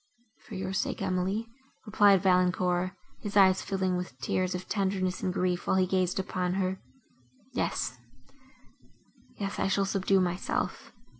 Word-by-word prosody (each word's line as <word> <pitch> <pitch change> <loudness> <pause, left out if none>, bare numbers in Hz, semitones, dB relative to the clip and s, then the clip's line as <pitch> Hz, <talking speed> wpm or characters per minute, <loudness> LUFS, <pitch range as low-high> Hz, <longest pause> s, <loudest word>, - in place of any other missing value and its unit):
"For 215 - -8
your 190 0 -3
sake, - - -1
Emily," 190 +3 -1 0.4
replied 205 -3 +5
Valancourt, 180 0 +2 0.3
his 205 0 -2
eyes 190 -1 +6
filling 190 -2 -1
with 180 -8 -6
tears 180 +8 -1
of 180 +1 -6
tenderness 190 -2 -1
and 185 - 0
grief, 180 -1 -1
while - - +3
he 185 -1 +4
gazed 185 -1 0
upon 185 -1 -1
her. 190 0 -1 0.7
"Yes—yes—I 190 - -6
shall 195 +1 +2
subdue 195 0 +2
myself. 180 0 -2
185 Hz, 130 wpm, -29 LUFS, 180-195 Hz, 0.7 s, eyes